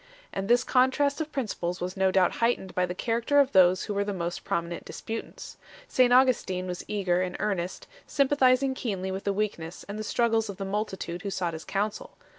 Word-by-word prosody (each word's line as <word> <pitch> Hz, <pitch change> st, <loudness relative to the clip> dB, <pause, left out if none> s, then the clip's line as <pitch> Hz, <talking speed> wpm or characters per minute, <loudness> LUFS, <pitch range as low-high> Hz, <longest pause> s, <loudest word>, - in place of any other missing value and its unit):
And 195 Hz, 0 st, -3 dB
this 240 Hz, +2 st, +4 dB
contrast 280 Hz, +3 st, +2 dB
of 310 Hz, 0 st, -4 dB
principles 190 Hz, -10 st, -3 dB
was 180 Hz, +1 st, -4 dB
no 190 Hz, -1 st, +3 dB
doubt 185 Hz, -1 st, +2 dB
heightened 230 Hz, -5 st, +1 dB
by 180 Hz, 0 st, +1 dB
the 180 Hz, -, -5 dB
character 235 Hz, +7 st, +1 dB
of 275 Hz, -1 st, +4 dB
those 185 Hz, -1 st, +5 dB
who 210 Hz, -, -3 dB
were 200 Hz, 0 st, +1 dB
the 200 Hz, -1 st, -3 dB
most 170 Hz, -1 st, -4 dB
prominent 170 Hz, 0 st, -3 dB
disputants. 225 Hz, 0 st, -7 dB, 0.3 s
St 250 Hz, -1 st, +3 dB
Augustin 245 Hz, -8 st, +3 dB
was 180 Hz, -1 st, -5 dB
eager 185 Hz, -4 st, 0 dB
and 180 Hz, -1 st, -3 dB
earnest, 185 Hz, -4 st, -2 dB, 0.2 s
sympathizing 265 Hz, -1 st, +3 dB
keenly 195 Hz, -7 st, -3 dB
with 190 Hz, +1 st, -5 dB
the 200 Hz, -, +2 dB
weakness 195 Hz, -5 st, -3 dB
and 205 Hz, +2 st, -5 dB
the -, -, -3 dB
struggles 225 Hz, -1 st, +1 dB
of 195 Hz, -, -6 dB
the 195 Hz, -, -4 dB
multitude 195 Hz, -3 st, -3 dB
who 200 Hz, -, -4 dB
sought 180 Hz, -3 st, -2 dB
his 160 Hz, 0 st, -7 dB
counsel. 205 Hz, +2 st, -3 dB
200 Hz, 200 wpm, -27 LUFS, 185-240 Hz, 0.3 s, those